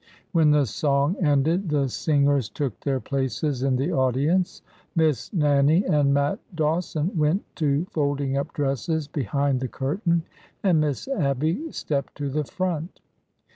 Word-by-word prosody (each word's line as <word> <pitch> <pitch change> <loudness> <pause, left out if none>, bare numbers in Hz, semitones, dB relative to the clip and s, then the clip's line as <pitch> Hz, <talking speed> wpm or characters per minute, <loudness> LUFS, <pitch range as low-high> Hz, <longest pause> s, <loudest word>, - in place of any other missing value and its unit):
When 160 -4 +4
the 150 -1 +4
song 140 - +1
ended, 160 +4 +2
the 145 -2 +1
singers 140 -2 +1
took 140 -7 -3
their 135 -2 -1
places 135 +1 -2
in 135 -1 +2
the 135 +7 0
audience, 140 +7 +1 0.3
Miss 160 -4 +1
Nannie 150 +1 +3
and 145 -2 +3
Matt 140 +1 +1 0.2
Dawson 160 +2 -1
went 155 +5 +2
to 150 0 +1
folding 140 -2 0
up 140 - -2
dresses 145 +2 -1
behind 140 0 0
the 130 - -2
curtain, 170 - -1 0.4
and 175 -6 +4
Miss 150 - -2
Abby 160 - -1
stepped 140 -2 -3
to 145 -1 -3
the 150 +1 -1
front. 175 0 -3
145 Hz, 140 wpm, -24 LUFS, 140-160 Hz, 0.4 s, When